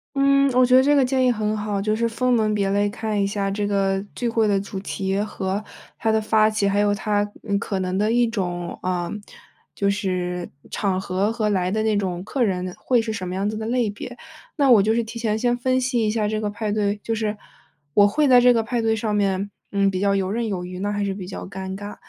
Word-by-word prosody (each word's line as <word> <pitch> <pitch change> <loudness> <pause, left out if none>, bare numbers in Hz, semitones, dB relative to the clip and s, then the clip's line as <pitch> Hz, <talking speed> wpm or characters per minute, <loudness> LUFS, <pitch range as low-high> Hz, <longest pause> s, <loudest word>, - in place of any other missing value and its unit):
嗯， 275 0 +4
我 255 +1 +5
觉 250 - +3
得 260 - +8
这 290 +2 +4
个 275 - +4
建 260 0 +1
议 250 - +4
很 215 -2 -1
好， 210 -1 -2
就 215 +2 0
是 230 +1 0
分 250 +2 0
门 220 -3 +2
别 200 -2 0
类 205 +1 +2
看 215 0 -2
一 - - +2
下 200 0 -1
这 205 +1 -1
个 195 -1 +1
聚 240 - -2
会 225 -2 +2
的 200 -1 +2
主 195 -1 -6
题 195 0 -2
和 200 -1 -3 0.4
它 225 - 0
的 220 0 +3
发 215 0 +3
起， 215 -2 0
还 200 +1 +1
有 205 0 +2
它， 205 0 -1 0.2
嗯， 200 -1 +1
可 200 -1 -3
能 185 0 -2
的 210 +2 +1
一 240 +1 +3
种， 175 -6 -3
呃， 180 -1 -1 0.6
就 200 - 0
是 180 -3 -2 0.2
场 190 -2 -1
合 190 +2 0
和 220 -2 -1
来 185 -2 0
的 215 +2 0
那 220 -1 +1
种 185 -3 -2
客 255 +5 -2
人， 185 -4 -1
会 245 -2 +2
是 225 -1 -3
什 185 -4 -4
么 180 - -4
样 195 +2 -1
子 215 - -3
的 220 0 -4
类 240 -2 +1
别。 245 +4 -8 0.4
那 280 -3 +3
我 220 -5 +7
就 215 +2 +2
是 235 0 +1
提 225 +1 -8
前 220 -2 0
先 245 +1 +1
分 255 +1 +1
析 250 -3 0
一 215 - +1
下 215 -1 0
这 215 +1 -1
个 210 - -1
派 210 0 -3
对， 205 -1 0
就 225 - -1
是， 215 -1 -2 0.6
我 205 0 +6
会 295 +8 +2
在 250 -2 +7
这 245 0 +6
个 230 -2 +2
派 235 +2 -2
对 225 0 +2
上 215 -1 -2
面， 200 -1 0 0.2
嗯， 200 -1 +2
比 185 -1 -3
较 200 0 +2
游 190 -1 -1
刃 230 +1 -1
有 185 -4 -3
余 180 0 -7
呢， 205 - -1
那 - - -2
还 205 - 0
是 195 -1 -2
比 190 -2 -7
较 185 - -6
尴 190 0 -6
尬。 205 +1 -7
210 Hz, 275 characters per minute, -23 LUFS, 195-225 Hz, 0.6 s, 得